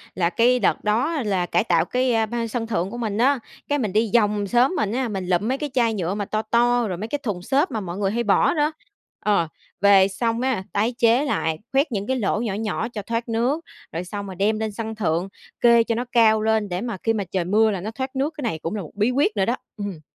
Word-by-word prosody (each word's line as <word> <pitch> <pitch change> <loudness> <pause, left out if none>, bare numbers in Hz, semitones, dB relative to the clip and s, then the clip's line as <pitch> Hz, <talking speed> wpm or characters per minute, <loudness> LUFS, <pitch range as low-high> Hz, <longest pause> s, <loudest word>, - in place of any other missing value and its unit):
là 170 -2 +1
cái 245 +6 +3
đợt 210 - +1
đó 240 +10 +1
là 190 -4 0
cải - - +1
tạo 170 -6 +2
cái 245 0 +1
ban 230 +1 -3
sân 225 0 -3
thượng 190 -4 -1
của 240 - -6
mình 220 -4 -2
á, 265 +4 +3 0.3
cái 290 - +1
mình 215 -7 -2
đi 220 0 +2
vòng 210 -3 +2
xóm 245 - +3
mình 210 - 0
á, 255 +2 -1
mình 195 -3 -3
lụm 180 +3 +1
mấy 260 +2 0
cái 295 +1 -4
chai 235 -3 +2
nhựa 185 -2 -2
mà 205 0 -3
to 215 +1 -1
to 240 +1 +2
rồi 180 - -3
mấy 210 +5 -4
cái 290 +5 -3
thùng 205 -8 -3
xốp 280 - +1
mà 220 - -2
mọi 180 -3 -5
người 195 -1 0
hay 235 +2 -1
bỏ 205 -3 +3
đó. 300 -1 +1 0.5
Ờ, 200 -6 +1 0.3
về 195 -1 +6
xong 230 +4 -1
á, 255 -7 0
tái 220 +4 +1
chế 235 +4 +3
lại, 160 - -1
khoét 275 +1 +2
những 200 -1 -3
cái 260 - +1
lỗ 210 -2 0
nhỏ 215 -5 -2
nhỏ 220 +1 -2
cho 210 - -4
thoát 230 +3 -3
nước, 245 +8 0 0.3
rồi 170 +2 -4
xong 200 +2 -6
rồi 190 -2 -7
đem 210 +4 +1
lên 220 -1 -2
sân 220 +1 -5
thượng, 180 -2 -1 0.3
kê 235 -1 +6
cho 230 0 -1
nó 245 +2 -2
cao 220 -2 +4
lên 220 -1 +1
để 180 +2 -2
mà 235 -4 -4
khi 225 - +2
mà 210 -2 -1
trời 185 -3 0
mưa 215 +4 +3
là 190 -3 -3
nó 215 +3 -4
thoát 260 +3 -5
nước, 280 +4 -1
cái 295 - -5
này 165 -9 -2
cũng 165 +6 -4
là 205 - -3
một 155 - -9
bí 210 +4 +2
quyết 265 -3 +2
nữa 195 -2 +2
đó. 240 +4 +1 0.2
Ừm. 200 -5 -5
220 Hz, 265 wpm, -23 LUFS, 200-240 Hz, 0.5 s, về